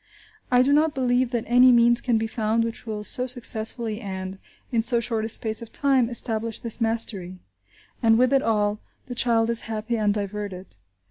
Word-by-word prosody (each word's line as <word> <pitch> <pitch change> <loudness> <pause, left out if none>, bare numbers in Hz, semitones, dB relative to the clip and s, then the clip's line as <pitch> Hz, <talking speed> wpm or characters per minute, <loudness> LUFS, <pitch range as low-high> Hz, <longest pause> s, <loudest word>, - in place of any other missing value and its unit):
I 250 0 +4
do 280 +2 +2
not 305 +1 +2
believe 250 -1 +1
that 240 -2 -2
any 250 +2 +5
means 235 0 +4
can 240 -3 +1
be 220 - -1
found 220 0 -1
which 230 0 -6
will 210 -1 -4
so 250 +4 -1
successfully 230 -2 -1
and, 190 -1 -6 0.3
in 230 -2 +1
so 235 +1 +3
short 225 -2 -2
a - - -4
space 220 0 +1
of 230 - -10
time, 265 -4 +2
establish 230 -2 -2
this 230 0 -1
mastery. 215 -5 -1 0.6
And 225 -1 +4
with 255 +2 +3
it 270 - +4
all, 210 -2 0 0.3
the 250 - -7
child 235 -1 +2
is 235 - +1
happy 220 +1 -3
and 210 -1 +1
diverted. 200 - -5
230 Hz, 190 wpm, -24 LUFS, 215-245 Hz, 0.6 s, any